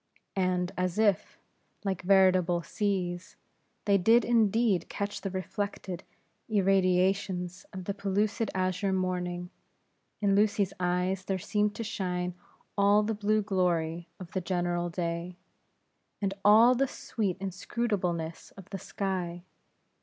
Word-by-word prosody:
And 180 -1 +1
as 185 +1 -1
if, 210 -3 +2 0.5
like 190 -2 -1
veritable 185 -2 +4
seas, 185 -3 -2 0.5
they 200 -1 +4
did 225 +6 +5
indeed 225 -5 +2
catch 200 0 -3
the 195 - -3
reflected 190 -1 -4 0.5
irradiations 190 -2 +1
of 185 -1 -7
that 200 +1 -4
pellucid 205 +2 0
azure 185 +1 0
morning; 180 -1 -2 0.7
in 200 -2 +2
Lucy's 205 -1 +2
eyes, 180 +1 0
there 195 - 0
seemed 210 +3 0
to 230 - -4
shine 180 -4 -2 0.4
all 205 +1 +4
the 220 +1 -1
blue 215 0 +1
glory 175 -4 0
of 180 -2 -9
the 185 - -1
general 175 0 -1
day, 170 +1 -3 0.8
and 195 -2 -1
all 220 +4 +7
the 270 +2 +1
sweet 205 -7 -3
inscrutableness 185 -4 -2
of 195 0 -13
the 195 - -4
sky. 180 -3 -3
190 Hz, 125 wpm, -29 LUFS, 180-205 Hz, 0.8 s, all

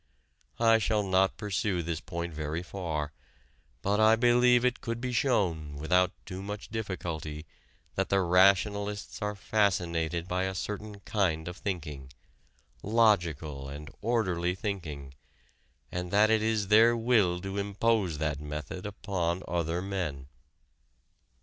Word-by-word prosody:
I 115 -1 +5
shall 105 -1 +1
not 95 0 +2
pursue 100 -3 -1
this 80 -1 -3
point 85 -2 -5
very 75 +2 -3
far, 80 -6 -3 0.7
but 100 +2 +1
I 110 +1 +6
believe 120 +1 +4
it 125 0 0
could 115 0 -3
be 125 +1 -3
shown 90 - 0
without 90 +5 +2
too 95 +1 -6
much 105 +1 -6
difficulty 85 -8 -4 0.5
that - - -1
the 100 -1 +3
rationalists 100 +3 +2
are 105 0 -2
fascinated 90 -5 0
by 90 +1 0
a 95 0 -3
certain 105 +1 -5
kind 85 -7 0
of 90 +1 -6
thinking 75 -10 -5 0.7
logical 85 -11 +1
and 75 +1 -8
orderly 90 -6 0
thinking 80 -9 -5 0.8
and 90 0 -3
that 105 +3 +4
it 110 -1 +3
is 110 -3 0
their 115 +2 +6
will 110 -7 +3
to 95 +1 -4
impose 100 -3 +1
that 75 -2 -1
method 75 +5 -5
upon 95 -3 -2
other 85 +1 -1
men. 90 -9 -3
95 Hz, 130 wpm, -29 LUFS, 85-105 Hz, 0.8 s, I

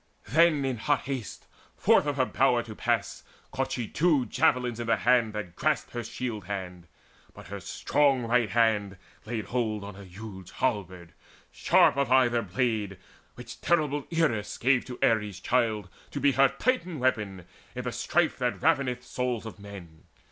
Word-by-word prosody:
Then 155 -2 +4
in 130 -2 -1
hot 145 +6 +1
haste 130 -5 -6 0.3
forth - - +3
of 145 - 0
her 130 - +3
bower 125 -3 +2
to 110 - -9
pass - - -1 0.3
Caught 135 0 -2
she 120 -3 -3
two 150 -4 +2
javelins 120 +1 +1
in 120 - -4
the 115 - +4
hand 120 -3 +2
that 95 -5 -6
grasped 155 -2 0
Her 120 -1 -4
shield 110 -4 -5
band; 90 -3 -6 0.5
but - - -12
her 100 0 -5
strong 135 - +1
right 120 -1 +2
hand 105 -3 +1 0.3
laid 110 -2 -3
hold 110 -4 -2
On 100 -1 -8
a 100 - -11
huge 95 -1 -10
halberd, 95 -8 -2 0.4
sharp - - +4
of 140 -3 0
either 120 -2 +4
blade, 105 -1 -1 0.4
Which 125 -1 -10
terrible 150 -4 +1
Eris 155 -11 0
gave 130 0 +2
to 125 -1 -8
Ares' 105 -5 +1
child 110 -5 0 0.2
To 145 - -5
be 140 0 +4
her 135 +1 +5
Titan 185 - -1
weapon 105 -9 -1 0.3
in - - -4
the - - -3
strife - - 0
That - - -1
raveneth 135 -6 +1
souls 125 -3 -3
of 110 -2 -9
men. 95 -6 -12
120 Hz, 170 wpm, -28 LUFS, 105-130 Hz, 0.5 s, her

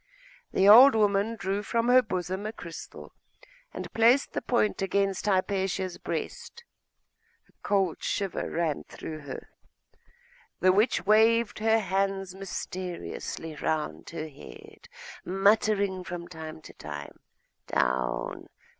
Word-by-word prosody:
The 195 - +3
old 245 +5 +9
woman 205 +1 +2
drew 195 0 -2
from 230 +2 -1
her 255 +1 +7
bosom 185 -1 -3
a - - -3
crystal, 170 -7 -10 0.6
and - - -7
placed 235 +5 +4
the - - -2
point 225 -5 0
against 195 +1 0
Hypatia's 190 -1 0
breast. 475 - -5 0.8
A - - -28
cold 195 -4 0
shiver 195 -3 -2
ran 165 -3 -1
through 155 -1 -8
her.... 140 -3 -8 1.1
The 185 - +5
witch 210 +6 +2
waved 220 +2 +4
her 220 +1 +3
hands 195 -2 -1
mysteriously 180 -4 -6
round 150 - -2
her 160 -1 -5
head, 430 - -14 0.3
muttering 200 0 +2
from 175 -1 -6
time 160 -2 -9
to - - -12
time, 75 -1 -8 0.5
'Down! 65 -1 -1
195 Hz, 120 wpm, -28 LUFS, 175-215 Hz, 1.1 s, old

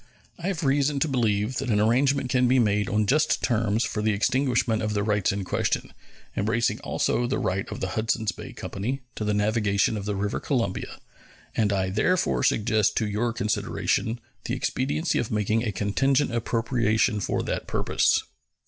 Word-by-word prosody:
I 170 - -4
have 185 -4 -2
reason 140 +1 +2
to 160 - +3
believe 115 -3 0
that 135 - -2
an 105 -2 +2
arrangement 130 +4 +2
can 125 -1 +3
be 130 +2 +4
made 105 -3 +2
on 105 0 +1
just 150 +7 +2
terms 115 -2 +1
for 110 -1 -2
the 110 0 +2
extinguishment 115 +1 +1
of 105 -1 -2
the 100 - +1
rights 105 -2 +1
in 100 0 -3
question, - - -1 0.4
embracing 110 +3 0
also 120 - 0
the 130 - -1
right 95 +1 -2
of - - -6
the 95 - -1
Hudsons 110 +1 0
Bay - - -9
Company 125 +8 -4
to - - -5
the 105 -1 0
navigation 105 0 +1
of 100 - -5
the 105 -1 -2
river 100 +1 -2
Columbia; 115 -9 -2 0.6
and 105 -2 +2
I 95 -2 0
therefore 180 - +1
suggest 110 -1 +2
to 110 - +1
your 110 +3 0
consideration 115 +1 -1 0.3
the 125 - -1
expediency 135 +5 -1
of 115 - -2
making 110 +1 0
a 110 - -1
contingent 135 +7 +1
appropriation 115 -2 +1
for - - -1
that - - -3
purpose. - - +2
110 Hz, 175 wpm, -25 LUFS, 105-130 Hz, 0.6 s, be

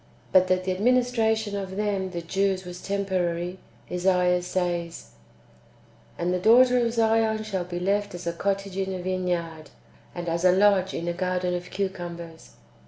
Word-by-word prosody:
But 185 0 +5
that 185 0 +1
the 185 - -1
administration 220 0 +1
of 190 -1 -4
them 200 -2 -1
(the 170 -2 -5
Jews) 190 +1 0
was 180 0 -8
temporary, 185 -3 -2 0.3
Esaias 180 0 +2
says: 175 -2 -3 0.5
" - - -30
And 175 +1 0
the 180 - 0
daughter 245 +4 +5
of 230 - 0
Zion 225 -1 +2
shall 195 -4 -3
be 175 0 -5
left 200 +1 0
as 175 - -8
a 170 - -1
cottage 195 +1 -2
in 190 -1 -2
a - - -5
vineyard, 175 -4 -2 0.5
and 175 -1 -5
as 170 +1 -1
a 180 - +6
lodge 190 0 +3
in 170 - -4
a 175 - 0
garden 180 0 -1
of 180 0 -4
cucumbers." 175 -4 -5
185 Hz, 170 wpm, -25 LUFS, 175-200 Hz, 0.5 s, a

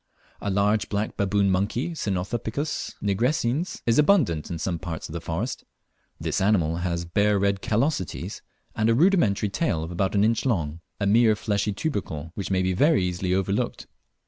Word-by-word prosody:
A 100 - -2
large 100 +2 +1
black 105 +1 -2
baboon 100 0 +2
monkey 105 - 0
(Cynopithecus 115 - -3
nigrescens) 125 - 0
is 115 +4 +3
abundant 145 - +3
in 85 - -3
some 85 +1 -2
parts 80 -1 -5
of - - -10
the 85 - -4
forest. 100 +12 -3 0.6
This - - -1
animal 90 -5 +2
has 85 -1 -2
bare 100 +4 +2
red 100 0 +1
callosities, 115 - -1 0.3
and 110 0 +2
a 115 - +4
rudimentary 135 - +3
tail 95 - -1
about 90 +4 -1
an 100 - +4
inch 115 +1 +2
long 85 - -1 0.2
a 100 - 0
mere 110 +2 +5
fleshy 105 0 -1
tubercle, 95 - -3
which 100 - -4
may 95 -1 +1
be 95 0 +1
very 145 - +3
easily 90 +1 -1
overlooked. 100 +5 -1
100 Hz, 165 wpm, -25 LUFS, 90-115 Hz, 0.6 s, mere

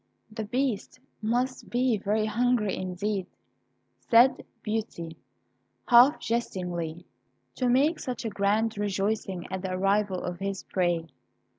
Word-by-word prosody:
"The 220 0 -4
Beast 250 0 -2 0.2
must 245 +4 -1
be 245 -1 +2
very 210 +1 0
hungry 225 -1 +1
indeed," 185 +1 -3 0.7
said 240 +2 +4 0.2
Beauty, 210 -7 -3 0.7
half 250 +4 +7
jestingly, 175 -7 -3 0.5
"to 250 -2 0
make 285 +6 +3
such 250 -2 -4
grand 205 +2 +1
rejoicings 195 -2 -1
at 190 -1 -3
the 185 -1 -3
arrival 195 0 +1
of 180 -1 -4
his 195 0 -3
prey." 175 -3 0
210 Hz, 115 wpm, -27 LUFS, 185-240 Hz, 0.7 s, half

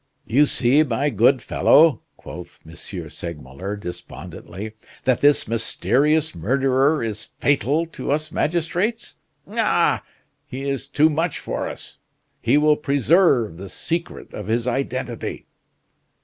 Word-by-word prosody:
"You 145 +5 +4
see, 135 +4 +4
my 145 0 0
good 120 +4 +3
fellow," 145 0 +4 0.2
quoth 85 +1 -10
M. 80 - -12
Segmuller, 85 0 -7
despondently, 100 +1 -8 0.3
"that 130 -2 +1
this 145 0 +4
mysterious 145 +7 +1
murderer 135 - +1
is 105 -1 -4
fatal 145 +3 +1
to 165 - -7
us 155 +2 -1
magistrates. 175 +9 -1 0.3
Ah! - - +2 0.5
he 135 +2 -5
is 135 -1 -3
too 155 +3 +3
much 165 +2 -1
for - - -4
us; - - -10 0.4
he 120 +5 +3
will 150 0 +4
preserve 140 - +2
the 95 +1 -8
secret 170 - -4
of 105 -2 -6
his 115 +2 0
identity." 125 -2 -3
135 Hz, 120 wpm, -22 LUFS, 110-150 Hz, 0.5 s, You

